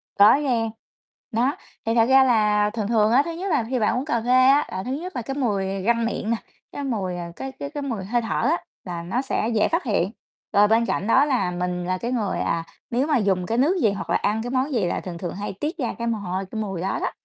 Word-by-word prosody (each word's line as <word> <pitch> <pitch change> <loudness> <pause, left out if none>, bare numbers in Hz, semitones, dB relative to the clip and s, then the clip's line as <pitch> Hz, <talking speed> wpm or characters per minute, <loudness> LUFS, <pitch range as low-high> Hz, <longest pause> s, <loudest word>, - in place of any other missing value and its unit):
Có 205 +5 +7
nghe, 245 -6 0 0.6
nó, 245 +6 +1 0.3
thì 225 +1 +1
thật 230 - +5
ra 265 0 +7
là 210 -4 +3
thường 215 -3 -3
thường 220 -2 +3
á, 255 +4 +6
thứ 335 - -3
nhất 370 +4 -4
là 240 - +2
khi 255 -1 0
bạn 215 +3 +2
uống 255 - -2
cà 235 -7 0
phê 245 +2 -1 0.2
á 280 +2 +5
là 190 - -3
thứ 250 - -4
nhất 360 +6 -5
là 245 - -1
cái 270 +4 -5
mùi 195 -7 -1
răng 230 +2 +2
miệng 225 -1 -2
nè, 230 - +2 0.4
cái 285 - -5
mùi, 195 -9 -2
ờ, 170 -1 -6
cái 270 0 -5
cái 280 - -4
cái 290 -1 -5
mùi 230 -9 -3
hơi 240 +4 0
thở 225 - -2
á 335 - 0 0.2
là 175 -2 -5
nó 220 +9 -1
sẽ 250 -4 -1
dễ 210 - +3
phát 335 +3 0
hiện. 200 -5 0 0.4
Rồi 205 +1 +6
bên 225 +2 +3
cạnh 205 - -1
đó 265 +4 +5
là 255 -11 +1
mình 180 0 -2
là 185 0 -1
cái 235 +6 -3
người, 215 -6 -1
à, 165 0 0 0.3
nếu 255 +5 +1
mà 295 -4 +3
dùng 190 -4 +1
cái 230 +4 -1
nước 320 +9 +3
gì 215 - +4
hoặc 200 - -5
là - - +2
ăn 215 +2 0
cái 245 - -4
món 265 +2 0
gì 215 -7 +1
là 175 - -1
thường 175 -2 -6
thường 175 0 -5
hay 205 0 -4
tiết 315 +4 -3
ra 250 -5 -2
cái 235 0 -3
mồ 230 - 0
hôi, 190 0 -3
cái 220 - -3
mùi 195 -5 -4
đó 190 - -1
đó, - - -1
225 Hz, 275 wpm, -23 LUFS, 195-260 Hz, 0.6 s, Có